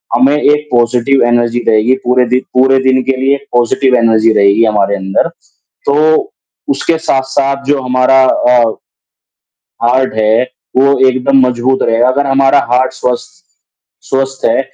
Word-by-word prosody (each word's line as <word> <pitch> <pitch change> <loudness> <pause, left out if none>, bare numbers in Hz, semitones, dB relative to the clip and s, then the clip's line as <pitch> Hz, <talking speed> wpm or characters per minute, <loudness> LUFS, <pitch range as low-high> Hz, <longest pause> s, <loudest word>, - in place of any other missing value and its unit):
हमें 130 +4 +2
एक 150 0 0
positive 120 +2 +1
energy 120 0 0
रहेगी, 110 +3 +2
पूरे 125 +1 +1
दि 125 +1 +1
पूरे 135 +1 +3
दिन 130 0 +2
के 135 - -1
लिए 140 +1 +1 0.2
पॉज़िटिव 125 +2 +1
एनर्जी 115 -1 +2
रहेगी 100 +2 +3
हमारे 100 -2 0
अंदर, 95 +8 -2 0.6
तो 155 - +1 0.4
उसके 170 - -1
साथ-साथ 135 +1 -1
जो 145 -2 0
हमारा 130 +1 +2
अ, 125 -1 +2 1.3
हार्ट 130 0 0
है, 110 +2 +1 0.3
वो 140 +1 +2
एकदम 130 +1 +1
मज़बूत 125 +2 -1
रहेगा, 115 +2 +1
अगर 140 +2 0
हमारा 135 +1 +2
हार्ट 130 +1 +1
स्वस्थ 125 +6 -5 0.7
स्वस्थ 135 0 -3
है - - +1
130 Hz, 140 wpm, -11 LUFS, 120-135 Hz, 1.3 s, पूरे